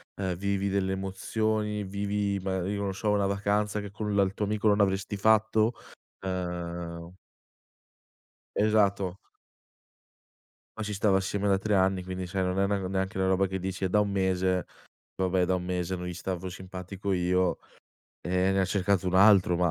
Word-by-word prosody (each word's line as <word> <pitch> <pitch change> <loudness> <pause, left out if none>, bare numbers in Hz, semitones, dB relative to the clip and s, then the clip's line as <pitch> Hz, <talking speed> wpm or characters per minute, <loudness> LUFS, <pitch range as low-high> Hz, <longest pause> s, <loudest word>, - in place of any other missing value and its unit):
ehm, 95 -2 -2
vivi 100 0 -1
delle 95 -1 0
emozioni, 105 +2 -1
vivi 100 +1 -1
ma 95 -1 -2
io 100 +1 -2
non 100 -1 -1
so 105 +2 -2
una 100 -1 +2
vacanza 105 +1 0
che 100 - -8
con 105 0 -3
la 100 - +5
il 95 0 -1
tuo 105 - -2
amico 105 +1 +1
non 105 0 +3
avresti 100 0 +1
fatto, 110 +2 +3 0.5
ehm 85 -2 -4 1.5
Esatto. 100 -3 +2 1.6
Ma - - -3
ci 105 - -3
stavo 100 -1 +3
assieme 100 +1 -1
da 95 -1 +3
3 105 +1 0
anni 95 -1 +2
quindi 95 0 -4
sai 95 +1 -1
non 90 +1 -1
è - - +4
una 100 -1 0
neanche 95 0 -2
una 95 - +2
roba 95 +1 +3
che 95 +1 -3
dici: 95 +1 -4
"È - - +2
da 105 +3 +3
1 105 -1 0
mese, 95 -1 +1 0.5
vabbè 95 -1 +2
da 95 - +1
1 90 - -4
mese 90 0 -2
non 90 0 -6
gli 90 - -4
stavo 95 +1 -4
simpatico 95 +1 -5
io 90 0 +1 0.6
e 90 +1 +1
ne 95 - +2
ha - - +3
cercato 95 0 +1
un 90 - 0
altro", 95 -3 +6
ma 90 -1 +2
95 Hz, 180 wpm, -28 LUFS, 95-100 Hz, 1.6 s, altro